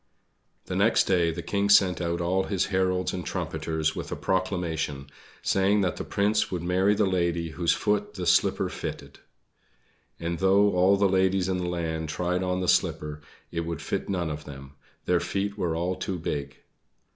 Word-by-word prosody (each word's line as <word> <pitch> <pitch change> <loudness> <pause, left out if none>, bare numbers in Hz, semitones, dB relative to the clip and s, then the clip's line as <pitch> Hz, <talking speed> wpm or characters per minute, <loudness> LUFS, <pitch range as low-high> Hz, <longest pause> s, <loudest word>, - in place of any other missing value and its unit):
The - - -4
next - - +4
day 90 -3 +2
the 85 +1 -4
King 100 0 0
sent 95 -3 +5
out 85 0 -1
all 95 +2 +1
his 95 -2 0
heralds 95 -1 +1
and 90 - -4
trumpeters 80 0 -2
with - - -6
a - - -1
Proclamation, 80 -7 -2 0.3
saying 100 +2 +2
that 95 - -1
the - - -3
Prince 105 +1 +1
would 90 -2 -3
marry 95 +4 +2
the 105 0 +2
lady 85 -3 0
whose 85 +1 +1
foot 105 0 -1
the 90 - -4
slipper - - +3
fitted. - - -7 1.0
But 85 0 -3
though 100 +2 +4
all 95 +2 +4
the 100 0 +3
ladies 95 0 +2
in 95 -1 0
the 90 -1 -2
land 80 -2 -3
tried 90 +3 -1
on 90 0 -1
the 90 - -2
slipper 75 -2 +1 0.3
it 85 - -3
would 85 -2 -3
fit - - -3
none 90 -5 -1
of 75 0 -6
them 70 -1 -10 0.3
their 90 -1 +3
feet 100 +2 -2
were 90 -5 -1
all 90 +3 -1
too 95 0 -3
big! 75 -4 -4
90 Hz, 180 wpm, -26 LUFS, 85-95 Hz, 1.0 s, sent